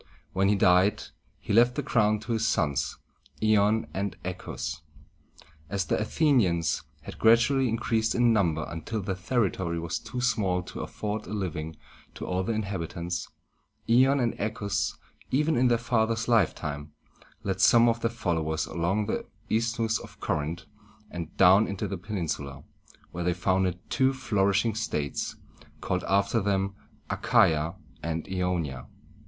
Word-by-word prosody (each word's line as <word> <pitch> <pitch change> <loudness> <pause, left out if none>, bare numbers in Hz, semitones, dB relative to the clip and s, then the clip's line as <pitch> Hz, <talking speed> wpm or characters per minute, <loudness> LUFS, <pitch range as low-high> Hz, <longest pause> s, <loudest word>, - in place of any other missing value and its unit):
When 95 +1 +2
he 105 - +4
died, 95 0 +4 0.3
he - - -4
left 120 +3 +5
the - - -2
crown 110 -2 +2
to 115 +2 -6
his 110 0 +1
sons, 75 -8 0 0.4
I´on 110 0 +3
and 95 -2 -2
A 90 - -1
chæ´us. 75 -3 -6 0.9
As 100 -2 -1
the - - 0
A - - 0
the´ni 135 - +3
ans 85 0 0 0.2
had - - -9
gradually 120 +3 +4
increased 110 0 0
in 120 -1 +4
number 80 -7 +1
until 95 +6 -4
their 95 - -2
territory 95 -3 -1
was 85 +1 -3
too 125 - -6
small 105 -7 +1
to - - -9
afford 105 +1 -4
a 100 - -6
living 80 -6 -3 0.4
to - - -6
all 90 0 -1
the 105 - -1
inhabitants, 90 -4 -3 0.6
Ion 130 +4 +5
and 120 -2 +1
Achæus, 105 -1 -1 0.3
even 150 +4 +2
in 125 +1 +4
their 120 -1 +3
father's 115 -1 0
lifetime, 75 -9 0 0.5
led 95 -1 -2
some 120 0 +6
of 115 0 +1
their 115 - +1
followers 80 -9 -1
along 90 +5 -1
the 110 - -3 0.2
Isthmus 115 0 +1
of - - -13
Corinth, 80 +4 -2 0.5
and 85 -2 -7
down 95 +3 +6
into 100 +1 -3
the 95 0 -5
peninsula, 80 -9 -4 0.5
where 90 - -4
they 90 0 +1
founded 95 0 +1
two 130 0 +3
flourishing 105 -3 +1
states, 75 -10 -2 0.4
called, 90 0 -2
after 100 +3 +2
them, 100 -1 0 0.4
A - - -1
cha´ia 80 +2 +3 0.3
and 80 -1 -3
I - - -10
o´ni 90 -6 0
a. 65 - -10
100 Hz, 155 wpm, -27 LUFS, 85-115 Hz, 0.9 s, some